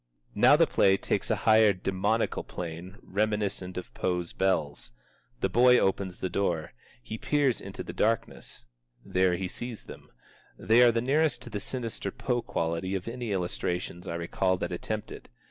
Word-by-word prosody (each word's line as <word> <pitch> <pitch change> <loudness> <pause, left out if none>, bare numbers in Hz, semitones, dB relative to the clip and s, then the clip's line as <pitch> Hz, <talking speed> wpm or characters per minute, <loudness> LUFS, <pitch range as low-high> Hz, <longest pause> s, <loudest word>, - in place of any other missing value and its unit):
Now - - +6
the - - +5
play 95 0 +3
takes - - -2
a - - +3
higher 110 -1 +6
demoniacal 95 +4 -1
plane 90 +3 -7
reminiscent 100 -3 -2
of 90 - -7
Poe's 90 -2 -2
Bells. 75 -9 -1 0.5
The - - +2
boy 125 +5 +5
opens 95 -3 0
the - - 0
door. 85 -5 -1 0.3
He 110 - -6
peers 145 -5 +1
into 100 0 -7
the - - -7
darkness. 115 - -2 0.4
There 90 -1 +2
he 95 +1 -3
sees 120 +4 -7
them. - - -12 0.5
They 115 +2 +4
are 120 -1 +7
the 115 0 0
nearest 150 +5 +1
to 120 - -10
the 105 - -3
sinister 115 -2 -4
Poe 120 +4 -2
quality 85 0 -2
of 95 +1 -4
any 120 -1 -4
illustrations 90 -1 -3
I 85 - -3
recall 95 +2 0
that - - -4
attempt 105 +4 -4
it. - - -10
95 Hz, 165 wpm, -28 LUFS, 90-115 Hz, 0.5 s, are